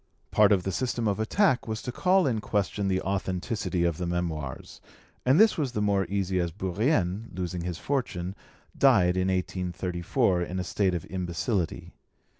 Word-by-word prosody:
] - - -45
Part 105 -1 +5
of 95 -3 +3
the 95 - -2
system 120 +2 -1
of 100 0 0
attack 130 - +2
was 110 -1 -3
to 125 - -3
call 185 +6 +3
in 115 -6 0
question 100 -1 -1
the 95 -1 +1
authenticity 95 0 -2
of 85 -1 0
the 90 - -2
Memoirs, 80 -6 -4 0.5
and 135 +5 +5
this 220 -5 +5
was 135 -5 -1
the 105 - -1
more 100 -3 +1
easy 95 -2 0
as 85 -1 -1
Bourrienne, 100 - 0
losing 90 0 -4
his 85 -1 -4
fortune, 95 -10 -2 0.4
died 95 -10 +4
in 95 0 +1
1834 90 +2 0
in 90 +1 -3
a 90 - -1
state 95 0 0
of 85 - -4
imbecility. 90 +1 -2
95 Hz, 175 wpm, -27 LUFS, 90-110 Hz, 0.5 s, Part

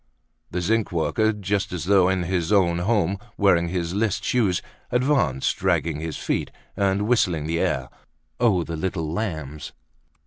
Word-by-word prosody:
The 90 - -2
zinc 110 +4 +1
worker, 110 +6 +1
just 100 -1 -2
as 90 -2 -4
though 95 -1 +4
in 95 -1 0
his 90 0 -1
own 90 -4 +3
home, 100 0 +1 0.2
wearing 85 -4 +3
his 85 -1 -2
list 105 0 0
shoes, 105 -8 +2 0.3
advanced, 125 - +1
dragging 80 -3 0
his 80 -2 -4
feet, - - -2 0.3
and 100 0 +1
whistling 90 -10 +2
the 85 +1 -1
air, - - 0 0.5
"Oh! 105 -8 +3
the 80 0 -5
little 80 -1 -2
lambs." 80 -8 -4
95 Hz, 150 wpm, -24 LUFS, 85-105 Hz, 0.5 s, though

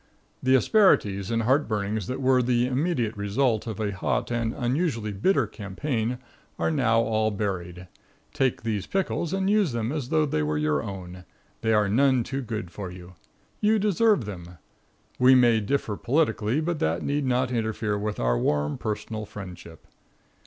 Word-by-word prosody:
The 130 0 +4
asperities 105 - +3
and 115 0 0
heart 135 +6 +2
burnings 105 -2 -2
that 130 - -3
were 130 -1 +3
the 120 0 +2
immediate 130 -3 -1
result 110 +3 0
of 110 -3 -5
a 105 -2 -1
hot 100 +4 -2
and 115 -1 0
unusually 120 -3 -1
bitter 120 - +2
campaign 110 +4 -3 0.4
are - - 0
now 115 -6 +3
all 110 -1 +1
buried. 95 -4 -4 0.5
Take 130 -4 0
these 105 -4 -2
pickles 185 -3 -1
and 190 0 0
use 205 - +2
them 115 0 -2
as 145 -5 -3
though 155 -1 +3
they 75 - -1
were 75 0 -1
your 75 -1 +1
own. 90 -1 -8 0.4
They 110 -1 +1
are 105 -1 +3
none 130 +3 +3
too 135 +3 -4
good 110 -8 -5
for 95 -1 -6
you. 90 0 -11 0.5
You 215 +1 +3
deserve 210 - +2
them. 90 -4 -8 0.6
We 130 +1 +7
may 120 -3 +5
differ 110 0 -1
politically, 130 -1 +1
but 165 -1 -2
that 80 +2 0
need 145 -1 -1
not 125 0 +1
interfere 110 -2 -1
with 105 +1 -3
our - - +1
warm 75 +3 0
personal 110 0 -4
friendship. 90 -5 -10
115 Hz, 165 wpm, -26 LUFS, 100-130 Hz, 0.6 s, We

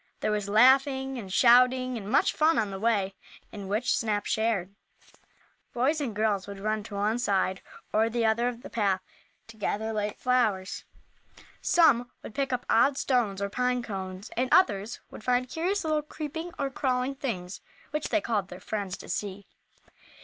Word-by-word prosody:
There - - 0
was 205 -1 -2
laughing 265 +4 +4
and 195 -4 -8
shouting, 250 +3 +5
and 205 -3 -6
much - - +3
fun 315 +2 +3
on 210 -3 0
the 195 - -5
way, 200 -3 +1 0.4
in 200 -2 -7
which 215 +5 +1
Snap 210 -2 -1
shared. 220 -4 0 1.0
Boys 285 +6 +1
and 240 -7 -3
girls 210 -2 0
would 200 -1 -8
run 215 +1 -1
to 210 - -8
one 210 +4 0
side 190 -4 0 0.3
or 220 +1 +3
the 230 0 0
other 225 +2 +2
of 245 -1 -5
the - - -8
path 195 -4 +1 0.4
to 225 -1 -14
gather 220 +1 -2
late 210 -1 -3
flowers. 220 -7 0 0.8
Some 260 -8 +4
would - - -9
pick 275 +2 -1
up 250 -1 -2
odd 270 +4 +4
stones, 220 -9 0
or 200 - -1
pine 250 0 0
cones, 190 -2 -6
and 255 +2 0
others 210 - +3
would - - -10
find 250 +1 +1
curious 355 +9 -1
little 310 -1 +1
creeping 315 +3 -6
or 275 -1 -2
crawling 260 0 0
things 200 -10 -5 0.3
which 300 0 -2
they 320 - +2
called 210 -7 -1
their 180 - -10
friends 200 -2 -4
to - - -11
see. 200 -1 -4
225 Hz, 175 wpm, -28 LUFS, 205-255 Hz, 1.0 s, shouting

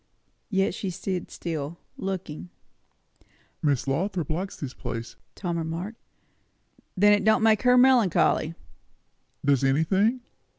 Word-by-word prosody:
Yet 195 -3 +1
she 195 - -4
stood 185 0 -4
still, 160 -1 -5 0.2
looking. 185 -3 -5 1.1
"Miss 140 -3 +1
Lothrop 170 +3 -1
likes 185 +5 -3
this 140 -3 -6
place," 120 -1 -6 0.2
Tom 170 -3 -3
remarked. 170 +7 -5 1.0
"Then 205 +2 +6
it 205 - +2
don't 220 +1 +4
make 220 -1 +4
her 250 0 +5
melancholy." 235 -10 +4 0.9
"Does 140 -2 +3
anything?" 190 - +2
180 Hz, 115 wpm, -26 LUFS, 155-205 Hz, 1.1 s, Then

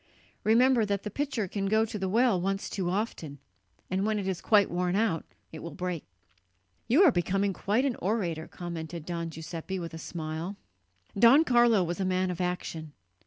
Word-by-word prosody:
Remember 240 +2 +4
that 200 -1 -1
the 210 - -5
pitcher 270 -5 -2
can 195 +1 -2
go 220 +2 +3
to 215 -1 -6
the 190 -1 -1
well 225 -3 +3
once 195 +2 -2
too 185 -3 -2
often; 180 -7 -3 0.5
and 190 +1 -1
when 215 0 +1
it 200 -2 -3
is 185 -2 -2
quite 205 -3 +4
worn 180 +1 0
out, 200 -6 +1 0.3
it 160 - -8
will 165 -2 -8
break." 180 -3 -4 0.8
"You 290 - +5
are 340 - +7
becoming 195 +1 0
quite 215 +8 0
an 265 -4 0
orator," 175 -6 -2
commented 170 -2 -6
Don 170 -1 -3
Giuseppe 160 +3 -6
with 170 -2 -6
a 160 - -7
smile. 160 +3 -5 0.6
Don 235 +9 +7
Carlo 240 - +4
was 175 +2 -3
a 190 - 0
man 185 0 +1
of 180 0 -4
action. 165 -4 -4
190 Hz, 185 wpm, -29 LUFS, 170-220 Hz, 0.8 s, are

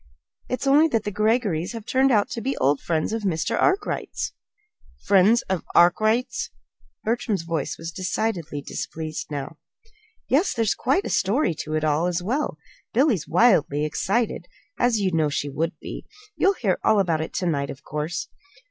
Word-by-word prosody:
It's 255 - -2
only 290 +4 +5
that 230 -8 0
the 205 - -3
Greggorys 210 -4 0
have 225 -2 -7
turned 265 +2 +3
out 210 -4 +3
to 230 - -4
be 265 +4 -2
old 140 +2 +2
friends 160 +4 -1
of 225 - -1
Mr. 170 -6 -1
Arkwright's." 390 +2 0 0.7
"Friends 200 +4 +5
of 190 -3 -2
Arkwright's!" 220 +8 +3 0.5
Bertram's 220 -4 -1
voice 165 -4 -3
was 165 +1 -6
decidedly 180 -5 -2
displeased 155 +2 -5
now. 145 +1 -5 0.7
"Yes; 310 +9 +2
and - - -16
there's 225 -2 +2
quite 370 +10 0
a - - -3
story 200 - +2
to 155 0 -3
it 155 - 0
all, 155 +3 +2
as 175 0 -1
well. 265 +10 -1 0.4
Billy 265 +2 +4
is 170 -6 -4
wildly 160 -7 +3
excited, 200 +9 -1 0.3
as 240 -3 +3
you'd 190 -3 0
know 155 -2 +2
she 145 0 -2
would 165 +5 -2
be. - - -8 0.3
You'll 390 - +3
hear 200 - 0
all 215 - +4
about 165 -5 +1
it 160 - -4
to 185 - -2
night, 140 -5 0
of 135 - -8
course." 150 +3 -3
190 Hz, 175 wpm, -24 LUFS, 160-235 Hz, 0.7 s, only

